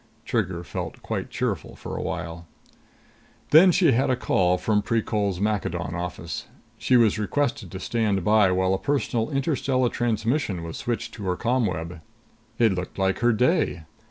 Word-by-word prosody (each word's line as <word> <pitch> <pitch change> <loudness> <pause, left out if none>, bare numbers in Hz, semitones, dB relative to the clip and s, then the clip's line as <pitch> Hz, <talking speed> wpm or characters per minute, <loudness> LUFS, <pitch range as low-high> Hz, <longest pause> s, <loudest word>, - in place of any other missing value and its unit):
Trigger 95 -7 -1
felt - - -6
quite - - -3
cheerful - - -3
for - - -7
a - - -3
while. 85 0 -5 1.0
Then 175 +5 +8
she 170 -3 +4
had 130 +2 +2
a 130 - +3
call 90 -7 +2
from 105 +2 +1
Precol's 105 -3 -1
Maccadon 105 -1 -1
office. 85 -1 -5 0.3
She 130 - +3
was 110 -3 +3
requested 110 -1 -1
to 95 - -6
stand 105 -4 0
by 105 0 +4
while 95 +1 +2
a 95 - 0
personal 125 -4 -1
interstellar 135 -3 0
transmission 115 - -1
was 80 -1 -6
switched 120 -1 -3
to 105 - -7
her 90 -1 -1
ComWeb. 90 -9 -1 0.6
It 115 -4 +4
looked 90 -1 -5
like 95 -1 +1
her 120 0 +3
day! 125 - +1
105 Hz, 155 wpm, -25 LUFS, 95-125 Hz, 1.0 s, Then